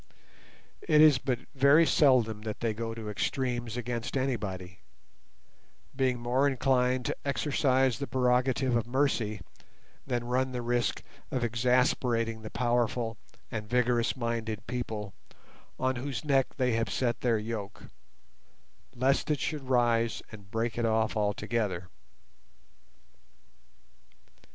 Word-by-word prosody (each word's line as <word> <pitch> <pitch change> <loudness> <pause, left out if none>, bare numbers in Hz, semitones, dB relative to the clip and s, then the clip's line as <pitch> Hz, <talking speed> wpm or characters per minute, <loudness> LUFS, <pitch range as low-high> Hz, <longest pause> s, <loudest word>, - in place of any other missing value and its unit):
It 150 - +3
is 150 -4 +7
but 130 -2 -1 0.2
very 140 +4 +5
seldom 125 -9 +3
that 110 -1 -5
they 115 -2 0
go 115 +1 -4
to 110 -2 -7
extremes 120 +1 -2
against 120 +1 -3
anybody, 95 -9 -3 1.2
being 130 -2 +1
more 125 +4 +2
inclined 130 -2 +1
to - - -2
exercise 135 -3 +1
the 140 - -3
prerogative 130 0 +1
of 115 -1 0
mercy 120 -6 0 0.7
than 120 -2 -1
run 130 +2 0
the 125 -1 -3
risk 120 0 0 0.3
of 125 -2 -2
exasperating 120 -1 +1
the 110 - -7
powerful 120 -1 0 0.4
and 105 -2 -5
vigorous 125 -1 +2
minded 115 -3 -3
people 110 -5 -4 0.7
on 130 0 0
whose 135 +3 -4
neck 135 -3 +3
they 125 -2 +2
have 115 0 0
set 120 -2 -1
their 120 -3 +2
yoke, 105 -2 -5 1.1
lest 135 +5 +1
it 150 -2 +1
should 145 -4 -3
rise 120 -2 +2
and 100 -3 -12
break 115 +2 -2
it 120 - +1
off 110 0 +1
altogether. 105 -3 -1
120 Hz, 120 wpm, -29 LUFS, 115-130 Hz, 1.2 s, is